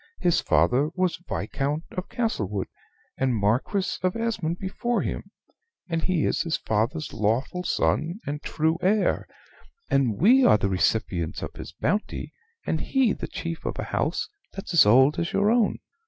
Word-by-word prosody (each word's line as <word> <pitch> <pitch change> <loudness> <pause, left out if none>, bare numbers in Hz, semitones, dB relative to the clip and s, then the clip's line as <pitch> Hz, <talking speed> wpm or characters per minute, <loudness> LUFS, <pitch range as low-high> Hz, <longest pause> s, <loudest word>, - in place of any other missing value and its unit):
His 175 -2 +2
father 110 - +3
was 185 -2 0
Viscount 145 +3 -2
of 185 - -5
Castlewood 105 - -1 0.5
and 130 -2 +1
Marquis 125 - 0
of 185 0 0
Esmond 220 -8 -1
before 235 +6 -1
him; - - -4 0.6
and 165 -2 -1
he 175 -2 +1
is - - +1
his 165 -1 -1
father's 115 +9 -1
lawful 115 - 0
son 160 - 0
and 145 +1 -4
true 160 +2 0
heir, 205 +4 +2 0.6
and 125 -6 +2
we 250 +9 +6
are 105 - +6
the 100 -1 0
recipients 90 -2 0
of - - -5
his - - -8
bounty, 205 +9 -2 0.3
and - - -1
he 260 -6 +2
the - - -5
chief 165 -1 -5
of - - -3
a - - -2
house - - 0 0.3
that's 195 -1 -6
as 160 -11 +7
old 130 +7 +5
as 170 - -2
your 205 +2 +3
own. 235 -3 +2
160 Hz, 160 wpm, -25 LUFS, 115-190 Hz, 0.6 s, as